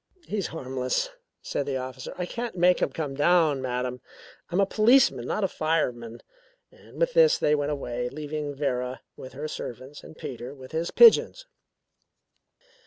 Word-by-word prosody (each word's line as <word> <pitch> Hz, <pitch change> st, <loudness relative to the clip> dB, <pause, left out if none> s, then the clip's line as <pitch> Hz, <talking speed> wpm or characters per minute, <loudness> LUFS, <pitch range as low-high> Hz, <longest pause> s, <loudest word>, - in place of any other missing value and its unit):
"He's 205 Hz, -4 st, -2 dB
harmless," 130 Hz, -, -2 dB, 0.3 s
said 140 Hz, -, -3 dB
the 135 Hz, -2 st, -1 dB
officer. 130 Hz, 0 st, -7 dB
"I 180 Hz, -, -2 dB
can't 235 Hz, +4 st, -5 dB
make 180 Hz, +1 st, +4 dB
him -, -, +2 dB
come 150 Hz, -4 st, -4 dB
down, 150 Hz, -1 st, +3 dB
madam. 125 Hz, 0 st, -3 dB, 0.5 s
I'm 180 Hz, -, 0 dB
a 200 Hz, -, +5 dB
policeman, 215 Hz, -, +4 dB
not 215 Hz, -, -1 dB
a -, -, +3 dB
fireman." 125 Hz, -9 st, -2 dB, 0.5 s
And -, -, -16 dB
with -, -, +1 dB
this 485 Hz, -1 st, +5 dB
they 150 Hz, -, +2 dB
went 145 Hz, -1 st, 0 dB
away, 125 Hz, -4 st, -3 dB
leaving 150 Hz, +1 st, -5 dB
Vera 130 Hz, -2 st, -2 dB
with 130 Hz, -1 st, -10 dB
her 145 Hz, +3 st, -5 dB
servants 135 Hz, 0 st, -8 dB
and 155 Hz, -, -13 dB
Peter 125 Hz, +1 st, -7 dB
with 130 Hz, -2 st, -12 dB
his 165 Hz, +2 st, -2 dB
pigeons. 475 Hz, +1 st, +6 dB
145 Hz, 160 wpm, -26 LUFS, 130-180 Hz, 0.5 s, pigeons